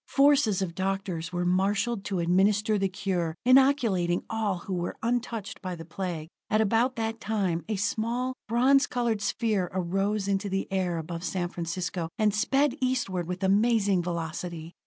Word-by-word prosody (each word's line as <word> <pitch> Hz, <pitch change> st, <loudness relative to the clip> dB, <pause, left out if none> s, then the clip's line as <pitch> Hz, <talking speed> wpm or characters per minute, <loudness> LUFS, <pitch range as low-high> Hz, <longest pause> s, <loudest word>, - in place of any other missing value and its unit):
Forces 275 Hz, -9 st, +4 dB
of 170 Hz, -3 st, -4 dB
doctors 190 Hz, -3 st, -2 dB
were 175 Hz, 0 st, -1 dB
marshalled 195 Hz, +4 st, +1 dB
to 195 Hz, -, -2 dB
administer 200 Hz, +5 st, +2 dB
the 195 Hz, 0 st, +1 dB
cure, 185 Hz, -4 st, -2 dB
inoculating 250 Hz, -10 st, +4 dB
all 215 Hz, -4 st, 0 dB
who 190 Hz, +2 st, -6 dB
were 175 Hz, -1 st, -2 dB
untouched 235 Hz, -3 st, -2 dB
by 185 Hz, -1 st, -4 dB
the 165 Hz, -1 st, -9 dB
Plague. 170 Hz, -2 st, -4 dB, 0.2 s
At 215 Hz, -, +2 dB
about 230 Hz, +4 st, +2 dB
that 225 Hz, -1 st, -3 dB
time, 190 Hz, -7 st, -1 dB
a 215 Hz, -, 0 dB
small, 230 Hz, +5 st, -1 dB
bronze 260 Hz, +5 st, +4 dB
colored 235 Hz, -4 st, -1 dB
sphere 205 Hz, -3 st, 0 dB
arose 195 Hz, +3 st, -1 dB
into 200 Hz, +1 st, 0 dB
the 195 Hz, 0 st, -1 dB
air 185 Hz, -3 st, 0 dB
above 165 Hz, +1 st, -5 dB
San 180 Hz, -1 st, -2 dB
Francisco, 170 Hz, 0 st, -3 dB
and 210 Hz, -1 st, +2 dB
sped 270 Hz, +6 st, +2 dB
eastward 245 Hz, -9 st, -1 dB
with 180 Hz, +2 st, -4 dB
amazing 200 Hz, -1 st, +3 dB
velocity. 170 Hz, 0 st, -4 dB
195 Hz, 155 wpm, -27 LUFS, 180-225 Hz, 0.2 s, Forces